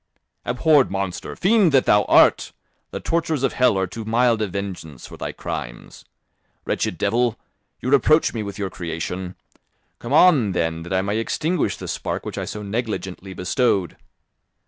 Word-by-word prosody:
"Abhorred 140 +3 +3
monster! 95 -2 -4
Fiend 195 -2 +3
that 135 - +4
thou 105 -1 +4
art! - - +4 0.4
The - - -5
tortures 160 -4 -1
of 135 - +1
hell 125 -6 +3
are 95 - +1
too 110 +5 -7
mild 115 +1 +2
a 105 - 0
vengeance 90 -8 -6
for - - -11
thy - - -5
crimes. - - -7 0.6
Wretched - - -1
devil! 115 +3 +1 0.4
You 130 - -2
reproach 155 +3 +4
me 115 - -3
with 100 -1 -6
your 100 -2 -3
creation, 90 +2 -5 0.6
come 120 - -7
on, 145 - +5
then, 80 -1 -1
that 85 +2 -9
I 95 0 +1
may 100 +3 -1
extinguish 160 +9 -1
the - - -8
spark - - -4
which - - -5
I - - -3
so 105 - -6
negligently 100 -3 -4
bestowed." 95 - 0
105 Hz, 165 wpm, -22 LUFS, 95-130 Hz, 0.6 s, on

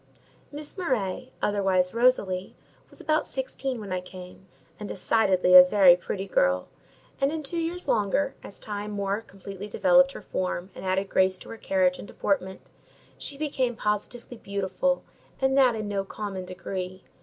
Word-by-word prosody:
Miss 300 +5 -6
Murray, 255 - -2
otherwise 190 -3 +1
Rosalie, 205 -6 +1 0.3
was - - -12
about 310 -1 0
sixteen 265 -1 -4
when 205 -3 -7
I 180 - -1
came, 180 +1 -12 0.3
and 210 - -6
decidedly 185 -3 +2
a 180 - +13
very 180 -1 +6
pretty 190 +2 -4
girl; 90 - +2 0.5
and 275 +1 +3
in 315 -1 -4
two 335 +5 -3
years 340 +2 -3
longer, 230 +7 +1
as - - -10
time 210 -1 -5
more 200 0 -2
completely 195 -1 -9
developed 270 +4 +4
her - - -9
form 185 0 -3
and - - -10
added 190 +1 0
grace 190 -1 +2
to - - -13
her 230 - -7
carriage 185 -3 +1
and - - -8
deportment, 190 -1 -2 0.5
she 280 - -6
became 265 -5 -1
positively 230 +3 -3
beautiful; 200 +7 -1 0.4
and 265 0 +2
that 255 -4 +5
in 215 -1 -4
no 200 -1 -1
common 195 -2 -6
degree. 185 0 -6
200 Hz, 160 wpm, -26 LUFS, 185-255 Hz, 0.5 s, a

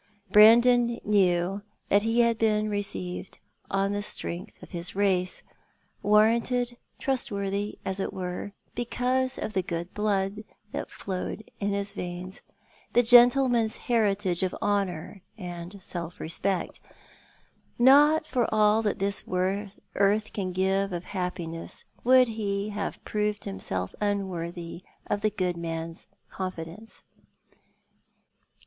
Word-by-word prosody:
Brandon 235 +3 +6
kuew 190 -1 +2 0.3
that 200 - +5
he 225 +2 +2
had 235 -1 +2
been 215 -1 +2
received 195 -3 -3 0.3
on 195 0 +1
the 205 0 -1
strength 190 -1 -5
of - - -12
his 175 0 0
race; 190 -2 +1 0.6
warranted 235 +4 +3 0.2
trustworthy, 205 -6 -2
as 190 0 -2
it - - -2
were, 180 +2 -5 0.2
because 255 +2 0
of 215 - -4
the 190 - +1
good 170 0 -5
blood 205 0 -1 0.3
that - - -4
flowed 195 +3 -5
in 200 -1 0
his 200 0 -2
veins, 180 -1 -6 0.5
the 245 - +5
gentleman's 245 -1 +5
heritage 205 -6 +1
of 185 -1 -1
honour 195 -2 -1 0.2
and 175 0 -7
self 170 -2 -5
respect. 180 +3 -1 1.0
Not 290 +5 +6
for 245 -5 0
all 215 0 +4
that 210 -2 -1
this 200 +1 0
earth 200 +2 0
can 190 -3 -2
give 190 +1 +1
of 175 0 -4
happi 180 -3 -3
ness 165 0 -6 0.2
would 255 +1 +6
he 205 -2 -2
have 205 -1 -5
proved 210 -1 -1
himself 95 -1 -4
unworthy 175 -4 -3 0.2
of 205 - -1
the 215 - +2
good 185 -4 -1
man's 165 0 -5 0.2
confidence. 185 +3 -7
200 Hz, 120 wpm, -27 LUFS, 180-220 Hz, 1.0 s, Brandon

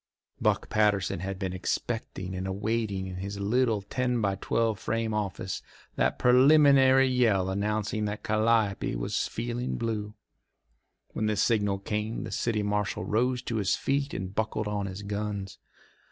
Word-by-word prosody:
Buck - - +1
Patterson 105 -4 +1
had 95 +2 -4
been 95 -1 -3
expecting 95 -1 -3
and 95 +1 -3
awaiting 100 0 -1
in 95 -1 -6
his 100 +2 -5
little 110 0 +1
ten 125 +3 -1
by 100 -3 +1
twelve 110 +2 0
frame 115 -1 -1
office 100 -3 -3 0.3
that - - +1
preliminary 135 0 +6
yell 110 -7 +2
announcing 105 +2 -1
that 105 0 -4
Calliope 110 - +1
was - - -1
feeling 120 +2 -3
blue. 110 -2 -3 0.9
When 110 - -2
the 105 - +1
signal 105 -1 +2
came 105 +3 -3
the - - -6
city 110 -3 0
marshal 105 0 -1
rose 125 +3 +1
to 115 - -2
his 100 -5 +2
feet 140 +1 -1
and 95 0 -4
buckled 110 0 -1
on 100 -1 -2
his 95 +2 -7
guns. 100 -1 -4
105 Hz, 150 wpm, -28 LUFS, 100-115 Hz, 0.9 s, preliminary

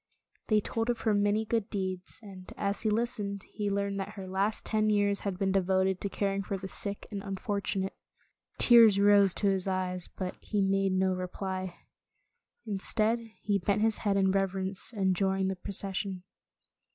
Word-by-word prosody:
They 215 -1 +3
told 225 +3 -2
of 240 -2 -1
her 220 - +2
many 205 +2 +2
good 225 -1 -1
deeds, 185 -2 -4
and 190 -3 -11
as 200 0 -1
he 220 - +1
listened, 210 -3 -1
he 205 -2 -2
learned 200 0 -1
that 200 +2 -5
her 195 -2 -7
last 195 +3 -1
ten 215 -1 +1
years 205 -1 +2
had 195 -3 -3
been 195 0 0
devoted 190 0 +1
to 200 - -1
caring 195 0 -1
for 195 0 -3
the 190 0 -6
sick 200 +1 -4
and 200 -1 -4
un 195 -1 -4
fortunate. 200 -3 -2 0.6
Tears 230 -4 +7
rose 200 -2 +5
to 205 - +2
his 190 -1 0
eyes, 185 -1 -2
but 185 -1 -4
he 210 - -2
made 195 0 +1
no 190 0 +2
reply. 185 0 -4 0.9
Instead, 215 +2 +1 0.2
he 205 -1 +1
bent 200 +3 0
his 225 -1 +2
head 200 -2 +1
in 190 -1 +3
reverence, 195 +2 0
and 190 -4 +1
joined 190 0 +1
the - - -3
procession. 190 -1 -3
195 Hz, 175 wpm, -30 LUFS, 190-205 Hz, 0.9 s, Tears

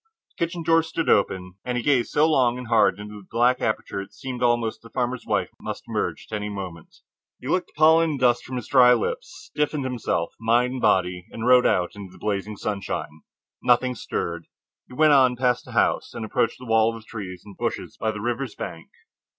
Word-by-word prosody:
The - - -1
kitchen 170 0 -6
door 165 0 +4
stood 165 0 -3
open, 90 -2 +1
and 125 -1 -2
he 120 - -2
gazed 130 -4 +2
so 155 +2 +3
long 125 -6 +3
and 125 -2 -8
hard 105 -5 +4
into 105 0 -9
the 95 - -20
black 125 +2 +2
aperture 110 -1 -2
that - - -14
it - - -31
seemed 125 -2 -6
almost 120 -2 +1
that 115 - -13
a - - -21
farmer's 125 0 -2
wife - - 0
must - - -5
emerge - - -2
at - - -2
any 105 0 -3
moment. 95 -5 -8 0.4
He 125 - -9
licked 180 +4 0
the - - -27
pollen 160 +1 +6
and 145 -3 -3
dust 120 -1 +3
from 130 - -7
his 125 -4 -5
dry 125 -2 +7
lips, 115 - -3 0.2
stiffened 150 -1 -1
himself, 115 -10 -2
mind 120 +2 +2
and 130 - -5
body, 90 -1 +1
and 115 - -6
rode 125 0 +6
out 90 -1 +1
into 100 -3 -9
the - - -16
blazing 105 0 -3
sunshine. 100 -7 -4 0.4
Nothing 125 +1 +3
stirred. 85 -7 -4 0.4
He 125 - -12
went 155 0 +5
on 130 -3 +5
past 125 -1 +1
the - - -11
house, - - +1
and 110 - -4
approached 110 +1 0
the 125 - -11
wall 115 0 +2
of 110 - -14
trees 95 -6 -7
and 100 -2 -12
bushes - - -4
by 110 - 0
the 105 -1 -4
river's 120 +2 -3
bank. 80 - -7
120 Hz, 220 wpm, -24 LUFS, 105-130 Hz, 0.4 s, dry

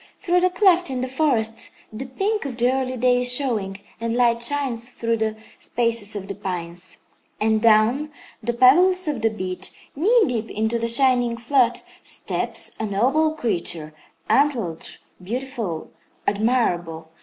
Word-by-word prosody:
Through 360 -2 +1
the 365 - +4
cleft 360 -2 +3
in 255 -2 -2
the 255 - -1
forest 250 -5 0 0.2
the 255 +5 -5
pink 400 +11 -1
of 265 -5 -5
the 245 +1 +3
early 260 -1 -2
day 250 +1 +3
is 245 0 +1
showing, 215 -8 -1 0.2
and 230 0 -2
light 235 -1 +3
shines 245 -2 -2
through 230 -2 -1
the 220 0 -1 0.2
spaces 230 -3 -2
of 195 -1 -5
the 200 - -4
pines. 180 -2 -5 0.4
And 220 0 +2
down 230 +6 +4 0.3
the 240 +1 -1
pebbles 350 +10 +5
of 285 -7 -2
the 225 - +3
beach, 185 -3 -4 0.2
knee 435 - +4
deep 235 -3 -2
into 220 +2 -1
the 230 - -1
shining 245 -1 +3
flood, 245 +1 +2 0.2
steps - - -2
a 220 - -1
noble 270 +10 +2
creature, 170 - -2 0.3
antlered, 225 - +1 0.3
beautiful, 230 -5 -4 0.3
admirable. 175 -8 0
235 Hz, 150 wpm, -23 LUFS, 215-265 Hz, 0.4 s, pebbles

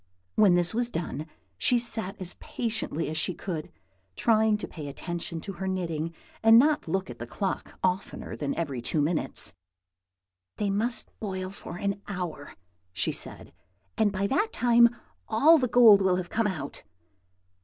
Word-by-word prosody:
When 200 -4 +5
this 175 +1 +1
was 240 +1 +2
done, 165 -5 -4 0.3
she 245 - +4
sat 225 -5 -3
as 185 -2 -4
patiently 220 -9 -2
as 155 - -3
she 175 +3 0
could, 165 -6 -5 0.4
trying 220 -2 +3
to 210 - -6
pay 150 -3 -8
attention 170 +3 -4
to 195 - -6
her 190 +2 -5
knitting, 165 -4 -2 0.3
and 225 +1 +8
not 300 +4 +5
to - - -8
look 190 -8 -1
at 120 - -11
the 120 - -6
clock 190 +11 -4
oftener 185 +1 -2
than 145 -2 -3
every 140 -7 -3
two 150 - -1
minutes. 155 +3 +2 1.0
"They 205 -1 0
must 230 +4 -1
boil 190 -3 -4
for 175 -3 -8
an 200 +1 -2
hour," 180 -7 -5 0.4
she 95 - -1
said; - - -6 0.4
"and 215 -2 +2
by 195 0 -1
that 295 - +1
time 235 0 +5 0.4
all 305 +9 +6
the 255 - +1
gold 225 -4 +7
will 190 -1 +3
have 180 -1 -3
come 225 -1 +1
out." 155 -8 -5
190 Hz, 165 wpm, -27 LUFS, 170-220 Hz, 1.0 s, and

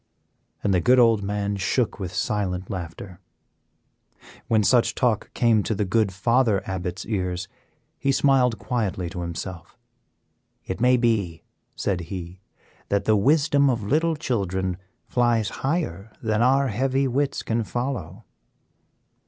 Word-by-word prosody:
and 100 - +2
the 90 - +3
good 125 +8 +4
old 115 -4 +5
man 100 0 -2
shook 105 +5 0
with 95 -3 -4
silent 95 -1 -2
laughter. 90 0 -7 1.3
When 110 -2 +3
such 120 +3 +3
talk 120 -5 0
came 115 -3 +3
to 110 - -2
the 105 +1 0
good 105 +1 +1
Father 115 +1 +2
Abbot's 95 0 -4
ears, 90 -4 -2 0.5
he 140 - +1
smiled 130 -4 +3
quietly 100 -8 -2
to 90 -1 -5
himself. 85 0 -7 0.9
"It 95 +4 -5
may 125 +1 +5
be," 110 -9 0 0.3
said 95 -3 -1
he, 90 -1 -7 0.5
"that 100 0 0
the 110 - +4
wisdom 140 +4 +3
of 115 -4 -1
little 160 +9 +1
children 95 - -2 0.3
flies 120 -4 +1
higher 130 - -2
than 110 -1 0
our 135 +2 +3
heavy 135 +5 +1
wits 140 +2 -1
can 115 0 -1
follow." 115 - -4
110 Hz, 135 wpm, -24 LUFS, 95-125 Hz, 1.3 s, old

